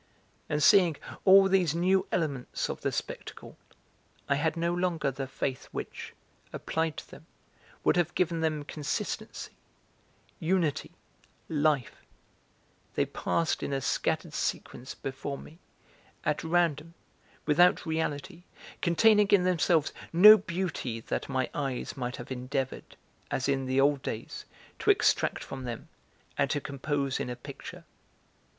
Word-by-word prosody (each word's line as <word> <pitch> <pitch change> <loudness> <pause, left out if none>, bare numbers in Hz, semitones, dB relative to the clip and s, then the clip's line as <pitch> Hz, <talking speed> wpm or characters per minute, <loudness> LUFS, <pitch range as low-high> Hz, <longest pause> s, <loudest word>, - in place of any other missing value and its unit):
And 150 0 0
seeing 175 -3 +6 0.3
all 195 0 +8
these 185 -5 +2
new 185 +3 +2
elements 145 -7 -2
of - - -8
the - - 0
spectacle, - - -6 0.7
I 140 - +3
had 160 +4 0
no 170 +1 0
longer 175 -5 0
the 135 0 -5
faith 130 -1 -3
which, - - -7 0.4
applied 160 -1 -2
to - - -9
them, - - -13 0.6
would - - +3
have 175 0 +1
given 170 -2 +1
them 155 -2 0
consistency, 145 0 -4 0.9
unity, 165 -3 0 0.5
life; 150 -5 +1 1.0
they - - +2
passed 165 -1 -1
in - - -3
a 135 - 0
scattered - - -1
sequence 125 - -3
before 135 +1 -5
me, 160 +4 -13 0.7
at - - 0
random, 165 -1 0 0.5
without 175 +5 +4
reality, 160 0 -3 0.4
containing 210 +4 +5
in 195 -2 +5
themselves 170 -3 +2 0.2
no 210 +6 +10
beauty 180 - -3
that 115 - -4
my 130 -2 0
eyes 135 -4 -3
might 125 -2 -3
have 120 - -9
endeavoured 130 +1 -4 0.3
as 135 - -1
in 135 -1 0
the 130 +1 +1
old 140 0 +3
days, 110 -3 -6 0.3
to - - 0
extract - - +3
from 130 -1 -7
them 120 -2 -6 0.5
and - - +2
to 145 - 0
compose 140 0 -2
in - - -3
a 125 - -4
picture. 120 - -10
155 Hz, 135 wpm, -29 LUFS, 135-175 Hz, 1.0 s, no